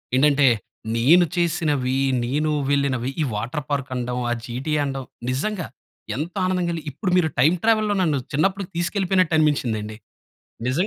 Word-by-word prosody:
ఏంటంటే 140 Hz, 0 st, +4 dB, 0.5 s
నేను 160 Hz, +10 st, +5 dB
చేసినవి, 150 Hz, -7 st, 0 dB, 0.3 s
నేను 150 Hz, +5 st, 0 dB, 0.2 s
వెళ్ళినవి, 135 Hz, -3 st, +1 dB
ఈ -, -, +3 dB
వాటర్ 125 Hz, +8 st, -3 dB
పార్క్, 140 Hz, -2 st, -1 dB
అనడం, 125 Hz, 0 st, -2 dB
ఆ -, -, +3 dB
జీటీఏ 135 Hz, +6 st, -2 dB
అనడం, 135 Hz, -2 st, -3 dB, 0.3 s
నిజంగా 180 Hz, +6 st, -2 dB, 0.5 s
ఎంత 160 Hz, +5 st, -4 dB
ఆనందంగా 180 Hz, -2 st, 0 dB
కలిగి 160 Hz, -3 st, -5 dB
ఇప్పుడు 180 Hz, -, -3 dB
మీరు 175 Hz, -3 st, +3 dB
టైమ్ 155 Hz, +7 st, +5 dB
ట్రావెల్లో 215 Hz, -2 st, +3 dB
నన్ను 155 Hz, -5 st, +2 dB, 0.2 s
చిన్నప్పటికి 195 Hz, +5 st, 0 dB
తీసుకెళ్ళిపోయినట్టు 185 Hz, -1 st, +1 dB
అనిపించిందండి. 110 Hz, -8 st, 0 dB, 0.7 s
నిజం 155 Hz, +10 st, +1 dB
150 Hz, 140 wpm, -23 LUFS, 130-175 Hz, 0.7 s, నేను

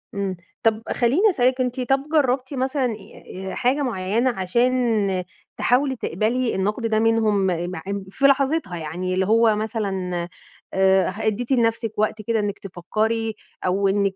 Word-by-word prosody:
امم، 195 Hz, -2 st, -2 dB, 0.3 s
طب 225 Hz, -1 st, +2 dB
خلِّيني 285 Hz, -, +3 dB
أسألِك، 255 Hz, -6 st, +2 dB
أنتِ 250 Hz, 0 st, -1 dB
طَب 270 Hz, +4 st, 0 dB
جرَّبتِ 260 Hz, -2 st, +1 dB
مثلًا 265 Hz, +1 st, 0 dB
أ 230 Hz, -3 st, -1 dB, 0.3 s
ي 190 Hz, +1 st, -7 dB
حاجة 265 Hz, +4 st, +1 dB
معيَّنة 225 Hz, 0 st, 0 dB
عشان 215 Hz, -1 st, +1 dB, 0.3 s
تحاولي 265 Hz, +2 st, +2 dB
تقبَلي 230 Hz, +5 st, -1 dB
النقد 210 Hz, +5 st, -1 dB
ده 215 Hz, -1 st, +1 dB
منهم، 220 Hz, -3 st, +2 dB, 0.2 s
معب 195 Hz, +2 st, -5 dB
في 275 Hz, +8 st, -1 dB
لحظتها 275 Hz, -, +2 dB
يعني، 170 Hz, +4 st, -3 dB
اللي 190 Hz, +1 st, +1 dB
هو 225 Hz, +1 st, +4 dB
مثلًا 200 Hz, -4 st, -2 dB, 0.6 s
آآ، 190 Hz, 0 st, +3 dB
أدَّيتِ 220 Hz, +5 st, -2 dB
لنفسِك 230 Hz, -2 st, +1 dB
وقت 215 Hz, 0 st, 0 dB
كده 225 Hz, +1 st, 0 dB
إنَّك 205 Hz, -1 st, -2 dB
تفكِّري، 215 Hz, +5 st, -2 dB, 0.3 s
أو 195 Hz, +2 st, +2 dB
إنَّك 195 Hz, -1 st, +1 dB
220 Hz, 145 wpm, -23 LUFS, 195-250 Hz, 0.6 s, هو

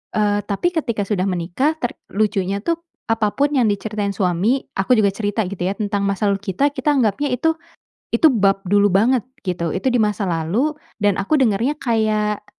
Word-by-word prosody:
Eee, 205 Hz, -1 st, +2 dB
tapi 205 Hz, -, 0 dB
ketika 235 Hz, -10 st, -1 dB
sudah 190 Hz, -3 st, 0 dB
menikah 185 Hz, -, -1 dB
ter 245 Hz, -, -3 dB, 0.2 s
lucunya 200 Hz, -2 st, 0 dB
tuh 335 Hz, +3 st, 0 dB, 0.3 s
apapun 225 Hz, +6 st, +1 dB
yang 245 Hz, -4 st, +3 dB
diceritain 205 Hz, 0 st, -2 dB
suami, 195 Hz, +7 st, 0 dB
aku 195 Hz, +6 st, +2 dB
juga 200 Hz, -, +4 dB
cerita, 205 Hz, 0 st, -1 dB
gitu 185 Hz, -1 st, -5 dB
ya. 190 Hz, +2 st, 0 dB
Tentang 205 Hz, -2 st, -1 dB
masa 200 Hz, +1 st, 0 dB
lalu 200 Hz, 0 st, -1 dB
kita, 280 Hz, +9 st, +2 dB
kita 285 Hz, +1 st, 0 dB
anggapnya 255 Hz, +2 st, +1 dB
itu 320 Hz, +6 st, +1 dB, 0.6 s
itu 305 Hz, +7 st, +5 dB
bab 195 Hz, -5 st, +2 dB
dulu 205 Hz, 0 st, +4 dB
banget, 230 Hz, +4 st, +3 dB, 0.2 s
gitu. 170 Hz, -3 st, -2 dB
Itu 195 Hz, +8 st, 0 dB
di 245 Hz, -, +2 dB
masa 210 Hz, -2 st, 0 dB
lalu 190 Hz, -, 0 dB, 0.3 s
dan 205 Hz, -2 st, +2 dB
aku 200 Hz, +9 st, -1 dB
dengernya 240 Hz, +3 st, +1 dB
kayak, 215 Hz, -3 st, 0 dB
210 Hz, 175 wpm, -20 LUFS, 195-250 Hz, 0.6 s, itu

